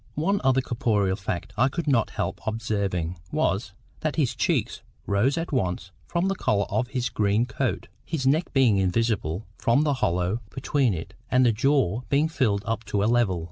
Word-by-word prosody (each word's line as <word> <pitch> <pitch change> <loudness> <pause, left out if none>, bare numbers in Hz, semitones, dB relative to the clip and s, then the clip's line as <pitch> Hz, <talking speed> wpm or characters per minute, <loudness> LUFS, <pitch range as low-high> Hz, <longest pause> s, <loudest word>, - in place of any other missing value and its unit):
One 195 +7 +1
other 130 0 +3
corporeal 105 -6 0
fact 95 -3 -4
I 130 +4 +4
could 165 +4 -3
not 125 -6 +3
help - - -3
observing, 100 -6 -2
was, - - 0 0.3
that - - -2
his - - +1
cheeks - - 0 0.2
rose 110 +9 +1
at 165 +1 -3
once 90 - -1 0.2
from 175 +2 0
the 195 - +1
collar 100 - +1
of 125 -1 0
his 125 -1 -2
green 105 +2 +1
coat, 115 - -2 0.2
his 145 -5 -3
neck 150 +6 +2
being 125 -7 +4
invisible, 95 -2 0
from 120 +6 +3
the 150 -2 +2
hollow 90 +5 0
between 130 -5 0
it 85 +4 -7 0.2
and 130 0 +4
the 120 - +5
jaw 120 -2 +1
being 145 +3 +2
filled 110 -10 0
up 115 0 -2
to 100 -1 0
a - - +2
level. 115 -6 +2
115 Hz, 180 wpm, -25 LUFS, 100-135 Hz, 0.3 s, the